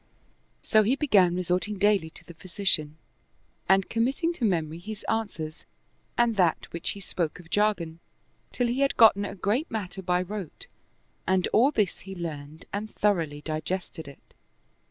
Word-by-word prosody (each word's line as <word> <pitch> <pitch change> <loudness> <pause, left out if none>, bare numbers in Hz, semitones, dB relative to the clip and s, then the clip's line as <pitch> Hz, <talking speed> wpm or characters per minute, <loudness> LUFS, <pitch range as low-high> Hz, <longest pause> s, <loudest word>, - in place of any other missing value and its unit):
So 215 - +5
he 225 +5 +2
began 200 - +4
resorting 180 +3 -1
daily 200 -4 +3
to - - -17
the 170 - -11
physician 165 -4 -1 0.7
and 190 0 +4
committing 270 +9 0
to 305 - -7
memory 165 -6 0
his 210 +3 -7
answers 180 -8 -3 0.5
and 235 -2 +2
that 175 -4 +1
which 170 - -2
he - - -8
spoke 175 -3 -3
of 165 -2 -15
jargon, 190 -6 +1 0.5
till 245 - 0
he 240 +2 -1
had 275 0 +1
gotten 205 -3 +6
a - - -6
great 215 - 0
matter 195 -4 -4
by 180 0 +1
rote, 195 -3 -7 0.6
and 185 0 +3
all 245 +6 +5
this 210 -10 0
he 195 0 -9
learned 155 -2 -7
and 210 +2 -4
thoroughly 165 -8 +1
digested 160 +1 -4
it. 140 - -15
190 Hz, 155 wpm, -27 LUFS, 170-215 Hz, 0.7 s, gotten